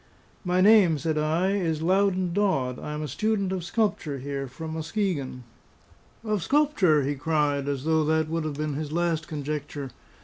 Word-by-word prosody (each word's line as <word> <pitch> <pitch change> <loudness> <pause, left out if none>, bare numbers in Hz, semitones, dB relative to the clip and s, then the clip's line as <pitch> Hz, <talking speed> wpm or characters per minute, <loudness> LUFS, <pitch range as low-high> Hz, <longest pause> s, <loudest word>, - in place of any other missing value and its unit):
"My 180 0 +1
name," 195 -6 +6
said 155 +1 -1
I, 160 +5 +1
"is 165 -6 -1
Loudon 185 0 +2
Dodd; 135 -11 0
I 150 - -5
am 150 +1 -4
a - - -3
student 200 - -1
of 185 -2 -2
sculpture 175 -7 -1
here 135 +1 -4
from 160 +5 -7
Muskegon." 160 - -2 0.8
"Of 215 -3 -1
sculpture?" 245 - +3
he 140 +2 0
cried, 145 -1 0
as 140 -2 -2
though 160 0 +2
that 160 0 +1
would 165 0 -2
have 150 -2 -3
been 155 -1 -2
his 150 +1 -4
last 165 -1 0
conjecture. 145 -2 -5
160 Hz, 170 wpm, -26 LUFS, 145-185 Hz, 0.8 s, name